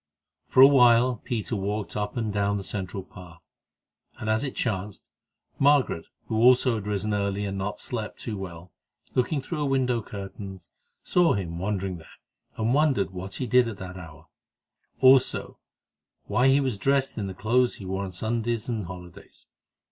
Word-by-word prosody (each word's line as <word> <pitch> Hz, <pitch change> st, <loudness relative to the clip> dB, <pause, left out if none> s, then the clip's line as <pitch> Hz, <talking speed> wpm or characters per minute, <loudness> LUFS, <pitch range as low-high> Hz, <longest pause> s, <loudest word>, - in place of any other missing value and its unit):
For 130 Hz, -, +5 dB
a 135 Hz, -, +11 dB
while 125 Hz, -2 st, +5 dB
Peter 115 Hz, -2 st, -2 dB
walked 105 Hz, +1 st, -3 dB
up 105 Hz, +2 st, -3 dB
and 110 Hz, -3 st, -1 dB
down 100 Hz, 0 st, +1 dB
the 100 Hz, -, -5 dB
central 95 Hz, 0 st, -5 dB
path, 90 Hz, -3 st, -13 dB, 0.8 s
and, 110 Hz, -, -1 dB
as 110 Hz, +4 st, +1 dB
it 140 Hz, -, -4 dB
chanced, 105 Hz, -3 st, -3 dB, 0.5 s
Margaret, 140 Hz, -, +3 dB, 0.2 s
who 110 Hz, -, -2 dB
also 125 Hz, +2 st, +5 dB
had 105 Hz, -2 st, -4 dB
risen 105 Hz, +1 st, -1 dB
early 100 Hz, 0 st, -1 dB
and 100 Hz, -1 st, -3 dB
not 95 Hz, +2 st, -3 dB
slept 110 Hz, -4 st, -5 dB
too 110 Hz, -, -4 dB
well, 90 Hz, -3 st, -8 dB, 0.4 s
looking 135 Hz, +3 st, +1 dB
through 170 Hz, +3 st, -4 dB
her 150 Hz, -, 0 dB
window 130 Hz, -3 st, +1 dB
curtains, 95 Hz, -3 st, -9 dB, 0.3 s
saw 175 Hz, -2 st, +3 dB
him 85 Hz, -4 st, -4 dB
wandering 95 Hz, -1 st, -2 dB
there, 80 Hz, -, -16 dB, 0.4 s
and 115 Hz, +2 st, +1 dB
wondered 140 Hz, -10 st, +2 dB
what 95 Hz, +1 st, -7 dB
he 130 Hz, -, -3 dB
did 125 Hz, -1 st, +4 dB
at 110 Hz, -3 st, -5 dB
this 95 Hz, -1 st, -8 dB
hour; 80 Hz, -3 st, -11 dB, 0.8 s
also, 130 Hz, 0 st, +4 dB, 0.7 s
why 125 Hz, +2 st, +2 dB
he 135 Hz, +1 st, +5 dB
was 130 Hz, -7 st, -1 dB
dressed 135 Hz, +2 st, +1 dB
in 100 Hz, -, -2 dB
the 95 Hz, -, -7 dB
clothes 120 Hz, +5 st, +2 dB
he 100 Hz, -, -10 dB
wore 95 Hz, +1 st, -2 dB
on 95 Hz, -, -5 dB
Sundays 115 Hz, +4 st, -2 dB
and 110 Hz, -7 st, -3 dB
holidays. 90 Hz, -1 st, -11 dB
105 Hz, 170 wpm, -26 LUFS, 95-125 Hz, 0.8 s, a